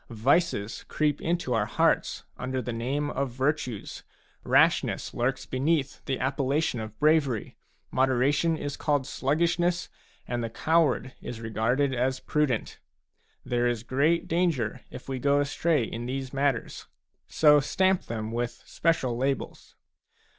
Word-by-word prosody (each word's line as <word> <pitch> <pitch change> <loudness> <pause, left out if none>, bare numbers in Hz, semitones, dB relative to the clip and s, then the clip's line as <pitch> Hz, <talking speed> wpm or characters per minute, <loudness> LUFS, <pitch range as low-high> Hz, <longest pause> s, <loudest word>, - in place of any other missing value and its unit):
Vices 120 - +1
creep 150 -2 0
into 170 -6 -1
our 110 -2 +1
hearts - - +1
under 130 +1 -3
the 125 -1 -4
name 140 +6 -2
of 140 0 -1
virtues, 130 -3 -2 0.4
rashness - - +2
lurks 130 +3 -1
beneath 140 +1 -1
the 135 -2 -2
appellation 135 0 0
of 110 -1 -7
bravery, 150 -7 +2 0.4
moderation 135 +5 +2
is 145 -1 -4
called 145 -3 0
sluggish 165 +6 0
ness, 175 0 0 0.4
and 120 -1 -2
the 115 - -2
coward 155 -1 +1
is 115 - -6
regarded 115 +5 0
as 130 +1 0
prudent; 145 -7 -1 0.7
there 120 0 +1
is 120 -2 -1
great 140 +7 +1
danger 150 - 0
if - - -10
we 135 -1 -3
go 140 +2 +3
astray 145 0 +1
in 115 +2 -5
these 130 0 -4
matters. 135 -3 -1 0.4
So 150 -1 +5
stamp 190 +6 +1
them 110 -1 -4
with 120 +1 -3
special 150 -8 0
labels. 135 +2 -3
135 Hz, 135 wpm, -27 LUFS, 120-150 Hz, 0.7 s, So